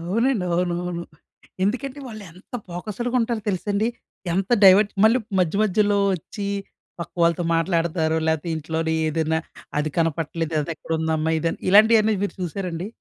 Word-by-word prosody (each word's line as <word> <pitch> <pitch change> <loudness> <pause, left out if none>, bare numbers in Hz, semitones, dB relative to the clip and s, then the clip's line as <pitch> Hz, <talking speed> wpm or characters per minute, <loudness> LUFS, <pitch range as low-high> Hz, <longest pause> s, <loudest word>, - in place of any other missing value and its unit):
అవునండి. 215 +5 0
అవునవును. 175 0 -1 0.6
ఎందుకంటే, 260 +7 -2
వాళ్ళు 215 -3 -8
ఎంత 185 +7 -16
ఫోకస్‌డ్‌గా 215 +8 -3
ఉంటారో 230 -2 -1
తెలుసండి. 205 +3 0 0.5
ఎంత 190 +4 -1
డైవర్ట్ 195 +2 +7
మళ్ళీ 230 +4 +5 0.2
మధ్య 180 +1 +1
మధ్యలో 205 0 +2 0.2
వచ్చి 200 +4 -6 0.5
పక్కవాళ్ళతో 170 0 0
మాట్లాడతారు. 165 -1 0
లేతే 160 +1 0
ఇంట్లోని 160 +1 -2
ఏదైనా 160 0 0 0.4
అది 155 +1 -1
కనపట్లేదు 165 0 -1
అది 165 +3 -3
ఎక్కడుందమ్మా 160 -1 -1
ఇది 165 +1 0
అన్ - - -10
ఇలాంటియన్నీ 220 +1 +6
మీరు 205 - -2
చూసారండి? 180 0 -4
180 Hz, 130 wpm, -23 LUFS, 165-210 Hz, 0.6 s, డైవర్ట్